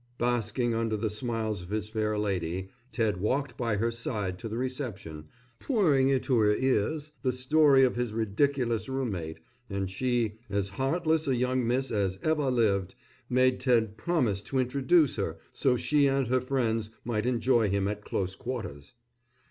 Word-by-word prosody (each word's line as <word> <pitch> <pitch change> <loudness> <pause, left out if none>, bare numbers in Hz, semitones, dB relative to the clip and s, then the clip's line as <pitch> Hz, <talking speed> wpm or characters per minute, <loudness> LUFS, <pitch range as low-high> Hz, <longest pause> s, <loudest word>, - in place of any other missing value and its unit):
Basking 120 0 0
under 115 -1 0
the 110 0 -2
smiles 110 -2 -2
of 90 - -11
his 105 0 -2
fair 110 -1 -1
lady, 95 -2 -2 0.2
Ted 110 -6 0
walked 125 +6 -1
by 115 -3 -1
her 115 +3 0
side 105 -5 -3
to 115 - -5
the 110 - -4
reception, 120 - -4 0.3
pouring 155 - +3
into 130 -2 +2
her 105 -1 +4
ears 135 +5 0
the 130 - +1
story 135 +2 +4
of 130 - +2
his 120 -2 -1
ridiculous 115 +3 0
roommate, 95 -12 -3 0.3
and 100 -1 -2
she, 115 0 -1
as 100 -1 -1
heartless 155 - 0
a 135 - +2
young 125 0 0
miss 130 +3 0
as 100 -4 0
ever 155 -3 +1
lived, 105 -7 +1 0.3
made 130 0 +3
Ted 115 -5 +2
promise 115 - 0
to 135 - -4
introduce 135 +4 +2
her 85 -6 -2 0.2
so 125 -2 +2
she 145 +2 +3
and 135 -3 +1
her 130 0 +2
friends 115 -4 -1 0.2
might 115 -1 -1
enjoy 120 -2 +2
him 100 0 0
at 105 0 -4
close 95 -2 -2
quarters. 110 - -6
115 Hz, 165 wpm, -28 LUFS, 105-130 Hz, 0.3 s, her